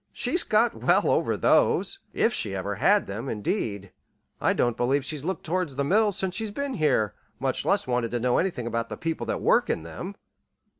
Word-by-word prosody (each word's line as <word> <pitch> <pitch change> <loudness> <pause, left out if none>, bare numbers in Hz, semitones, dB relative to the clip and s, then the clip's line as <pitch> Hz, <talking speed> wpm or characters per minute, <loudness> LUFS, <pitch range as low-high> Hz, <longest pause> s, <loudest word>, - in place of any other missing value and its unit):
"She's 310 +8 +1
got 225 +2 +3
well - - +2
over - - +1
those 390 - +2
if 235 - +1
she 100 - -2
ever 95 +2 -3
had 200 - +3
them, 110 +7 -5
indeed. 105 - -3 0.5
I - - +3
don't 120 -1 +1
believe 135 +3 +1
she's 150 -1 -5
looked 190 +3 -3
toward 180 0 -1
the 140 +1 -2
mills 205 +5 +2
since 190 -2 -1
she's 220 +2 -2
been 280 +6 -3
here 135 - +1 0.3
much - - -1
less - - +2
wanted 125 -2 0
to 120 - -2
know 125 +1 +2
anything 170 -10 -1
about 115 0 -2
the - - -6
people 165 0 -3
that - - -2
work - - +3
in 80 - -1
them!" 170 - -7
145 Hz, 200 wpm, -26 LUFS, -, 0.5 s, got